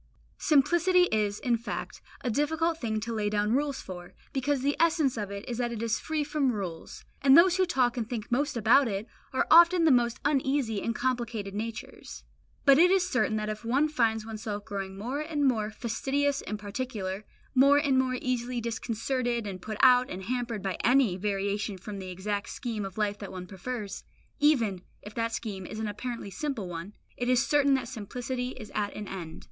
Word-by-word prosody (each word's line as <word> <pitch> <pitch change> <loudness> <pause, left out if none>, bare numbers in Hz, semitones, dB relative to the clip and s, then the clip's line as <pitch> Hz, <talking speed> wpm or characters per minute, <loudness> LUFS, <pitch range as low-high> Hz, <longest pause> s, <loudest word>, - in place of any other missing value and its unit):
Simplicity 345 +5 +4
is, 210 -1 0
in 240 -2 +1
fact, 230 - -6 0.2
a 245 - -1
difficult 320 +5 0
thing 220 -3 -1
to 230 +1 -3
lay 210 -2 0
down 210 +1 +1
rules 280 +1 0
for, 175 -1 -9 0.2
because 275 0 0
the 285 +1 +1
essence 315 -5 +3
of 210 -3 -3
it 200 0 -7
is 240 -1 -4
that 240 -1 0
it 230 -1 -4
is 230 -1 0
free 310 -1 -1
from 290 -3 +1
rules; 185 -7 -6 0.2
and 270 +1 +7
those 360 +1 +6
who 375 -1 +3
talk 255 -8 +1
and 225 -2 -2
think 230 -3 -5
most 280 +1 0
about 235 +5 +5
it, 200 -1 -3 0.3
are 260 - +1
often 340 +1 +7
the 320 - +5
most 240 -2 +2
uneasy 270 -6 +1
and 230 - -2
complicated 235 -5 -2
natures. 225 +2 -6 0.4
But 275 0 +7
it 355 +2 +7
is 375 -1 +3
certain 230 -11 +1
that 215 0 -2
if 215 +1 -4
one 265 +6 +2
finds 225 -7 +1
oneself 215 -2 -5
growing 195 -2 -5
more 250 +8 -3
and 305 -2 -1
more 220 -5 +2
fastidious 270 +6 -1
and 210 - -4
particular, 205 -2 -4 0.3
more 275 +2 +6
and 285 -2 +2
more 255 -1 +1
easily 250 -1 -2
disconcerted 235 +1 -2
and 190 -3 -6
put 215 +1 -5
out 250 -1 +6
and 185 +1 -6
hampered 235 -2 -3
by 190 -2 -2
any 245 -6 +4
variation 200 +1 -2
from 200 +2 -7
the 185 -1 -7
exact 200 +3 -3
scheme 225 -6 -4
of 195 0 -8
life 205 -1 0
that 200 - -7
one 185 -1 -6
prefers, 200 +2 -6 0.4
even 230 -11 +3 0.2
if 210 - -9
that 230 0 -1
scheme 195 -5 -5
is - - -7
an 220 0 -2
apparently 225 0 -5
simple 270 -6 -3
one, 175 +3 -7 0.2
it 245 0 -1
is 255 +1 +3
certain 280 -2 +4
that 260 -3 -2
simplicity 250 +2 -4
is 215 -4 -9
at 205 -1 -1
an 210 -1 -6
end. 170 -5 -7
235 Hz, 195 wpm, -28 LUFS, 210-270 Hz, 0.4 s, and